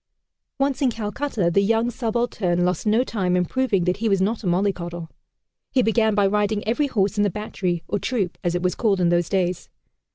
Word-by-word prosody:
Once 275 -1 0
in 270 - +3
Calcutta, 220 -3 -2
the 200 - +3
young 225 +3 +1
subaltern 225 -7 -1
lost 180 +3 -1
no 220 +4 +3
time 190 -8 -1
in 180 0 +2
proving 235 -3 0
that 180 +1 0
he 225 +1 0
was 195 -1 +2
not 210 +4 0
a - - -2
mollycoddle. 175 -2 -1 0.6
He 260 -2 +2
began 220 -1 +2
by 205 -1 +3
riding 210 +1 0
every 265 +6 +1
horse 205 -5 0
in 205 - +3
the 205 - +2
battery, 180 -4 -3
or 205 - -1
"troop," 200 -9 -2
as 175 0 0
it 175 - -2
was 180 - +1
called 205 -5 +1
in 175 -1 +3
those 175 0 +1
days. 185 -2 -1
205 Hz, 205 wpm, -23 LUFS, 180-225 Hz, 0.6 s, in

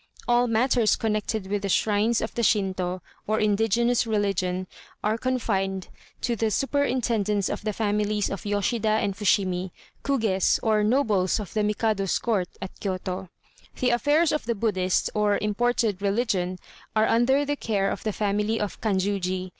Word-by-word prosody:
All 240 0 +3
matters 230 0 +3
connected 215 -1 -2
with 200 +1 -2
the 200 - -3
shrines 215 +3 +2
of 220 - -4
the 235 - -2
Shintô, 185 -4 0 0.3
or 215 +1 +1
indigenous 225 +3 +2
religion, 195 -4 0 0.4
are 215 +1 +1
confided 200 -7 -1 0.3
to 240 - 0
the 225 0 0
superintendence 235 -6 0
of - - -3
the 215 - -1
families 210 0 0
of 195 - -5
Yoshida 210 +2 0
and 215 -2 +1
Fushimi, 190 -3 +1 0.3
Kugés 220 -9 +2
or 215 -2 +2
nobles 215 -5 +2
of 205 - -7
the 215 - +1
Mikado's 210 -2 0
court 205 -6 0 0.2
at 190 - -7
Kiyôto. 185 -1 -4 0.5
The 250 -2 +2
affairs 295 +7 +3
of 300 -4 -1
the 235 - 0
Buddhist 190 -4 0
or 210 -1 +2
imported 210 -1 0
religion 195 -3 0 0.4
are 215 0 +4
under 265 +5 +3
the 290 +1 -1
care 200 -7 0
of - - -4
the 215 - 0
family 210 +2 0
of 210 -2 -4
Kanjuji. 190 -3 -1
210 Hz, 155 wpm, -25 LUFS, 195-230 Hz, 0.5 s, are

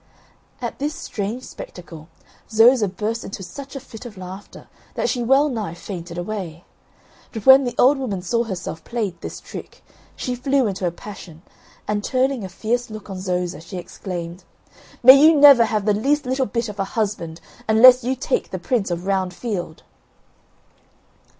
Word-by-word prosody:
At - - -4
this 295 +2 -2
strange 215 +5 -5
spectacle 165 -7 -10 0.4
Zoza 225 0 +5
burst 215 +5 -3
into 195 0 -7
such 270 +11 -9
a - - -4
fit 235 -4 -12
of 230 -5 -10
laughter 185 +2 -10 0.3
that - - 0
she 245 - -1
well 270 +5 +4
nigh 215 - -4
fainted 175 -2 -8
away. 175 -3 -5 0.7
But 220 -3 -7
when 265 0 +8
the 245 -1 -3
old 270 +2 +5
woman 205 -9 -3
saw 235 +5 0
herself 180 -5 -6
played 210 -8 -4
this - - -7
trick, - - -10 0.3
she 250 - -3
flew 270 +1 +1
into 190 -3 -2
a - - -1
passion, 175 -3 -11 0.4
and 210 0 -1
turning 260 -1 0
a 190 - -6
fierce 235 +6 -2
look 215 -2 -9
on 190 - -5
Zoza 180 -2 -2
she 170 +3 -8
exclaimed: 175 -1 -7 0.6
"May 260 +3 +10
you 320 +1 +7
never 280 -5 +8
have 215 -2 -1
the 210 - +3
least 280 +8 +1
little 260 +1 0
bit 230 +3 -2
of 210 -1 -8
a - - +2
husband, 195 -7 -2 0.3
unless 250 +3 +7
you 255 +2 0
take 260 - -2
the 185 - -4
Prince 200 +3 -1
of 175 +1 -3
Round 190 -2 -1
Field." 185 -9 -5
215 Hz, 170 wpm, -21 LUFS, 185-250 Hz, 0.7 s, May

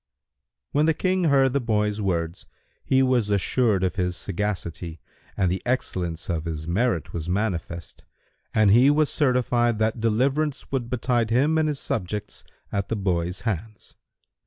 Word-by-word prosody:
'" 65 +3 -60
When 150 +2 +2
the 160 - +3
King 185 +1 +1
heard 135 -4 +4
the 140 - +2
boy's 105 -2 0
words, 85 -3 -2 0.4
he 135 0 +3
was 125 -5 +2
assured 100 0 +2
of 95 +1 -1
his 90 -2 -1
sagacity, 85 -4 -4 0.4
and 95 -3 +2
the 95 - -2
excellence 90 -10 -2
of 85 -3 -2
his 80 -1 -4
merit 90 - 0
was 85 0 -4
manifest 90 -4 -3 0.5
and 110 -2 +4
he 125 +6 +6
was 150 0 +3
certified 125 -4 +2
that 110 +2 0
deliverance 135 +6 0
would 125 -4 -2
betide 120 -2 0
him 140 +7 +3
and 155 - +2
his 150 -2 -2
subjects 105 0 -4 0.3
at 100 0 -2
the 115 - 0
boy's 90 -3 -1
hands. 110 -1 -5
110 Hz, 160 wpm, -24 LUFS, 90-125 Hz, 0.5 s, he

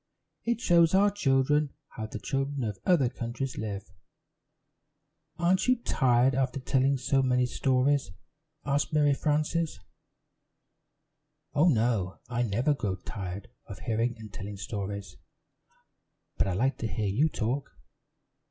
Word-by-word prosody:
It 235 0 0
shows 170 -6 +4
our 200 +1 +5
children 145 -4 +2
how 110 -4 -6
the - - -6
children 135 0 -2
of 105 -4 -3
other 170 -8 +4
countries 120 +2 -4
live." 100 -2 -4 1.5
"Aren't 175 +4 +2
you 255 - +5
tired 130 - +2
after 130 0 0
telling 135 +1 +2
so 135 +1 +1
many 125 -1 +2
stories?" 130 0 +1 0.6
asked 145 +2 0
Mary 145 -2 +4
Frances. 155 -1 0 1.7
"Oh, 150 +5 +4
no, 110 - +1
I 120 -1 -1
never 120 +6 +1
grow 100 -9 -2
tired 95 0 -7 0.2
of - - -8
hearing 115 +2 0
and 110 -3 -11
telling 100 +1 -6
stories; 100 -5 -5 1.2
but - - +1
I 95 - 0
like 130 +8 0
to 115 - -1
hear 110 -1 -2
you 120 +11 +2
talk. 130 +2 -2
130 Hz, 130 wpm, -28 LUFS, 110-145 Hz, 1.7 s, our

